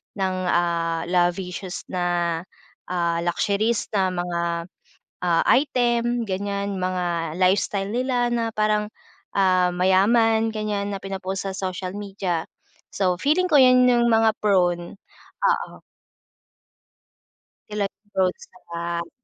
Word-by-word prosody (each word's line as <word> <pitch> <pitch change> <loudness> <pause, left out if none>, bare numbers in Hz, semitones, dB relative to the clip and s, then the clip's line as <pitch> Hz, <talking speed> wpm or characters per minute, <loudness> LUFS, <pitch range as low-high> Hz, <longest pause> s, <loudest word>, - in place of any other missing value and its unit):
ng, 190 -2 -1
ah, 170 -1 0
lavicious 180 +1 -1
na, 175 -2 0 0.5
ah, 170 -2 0
luxuries 205 +6 0
na 195 -3 +2
mga, 175 -1 -2 0.8
ah, 170 -2 +2
item 240 -3 +2
ganyan, 200 0 -3
mga 175 -3 -2
lifestyle 195 +2 +1
nila 245 0 0
na 230 -1 0
parang, 215 0 +1 0.5
ah, 185 -2 +3
mayaman, 220 +5 +3
ganyan 205 -1 -2
na - - -5
pinpost 195 0 -4
sa 195 - -3
social 185 -1 -4
media. 195 -5 -3 0.5
So, 180 -3 +1
feeling 330 - +1
ko 290 - +7
'yan 255 -1 +6
'yung 240 -1 +3
mga 225 -1 +4
prone. 175 -4 +1 0.5
Oo. - - 0 1.9
Sila 210 -1 -1
yung 210 - -62
prone 185 -1 +1
sa - - -16
hack. 170 0 -3
195 Hz, 115 wpm, -23 LUFS, 175-220 Hz, 1.9 s, ko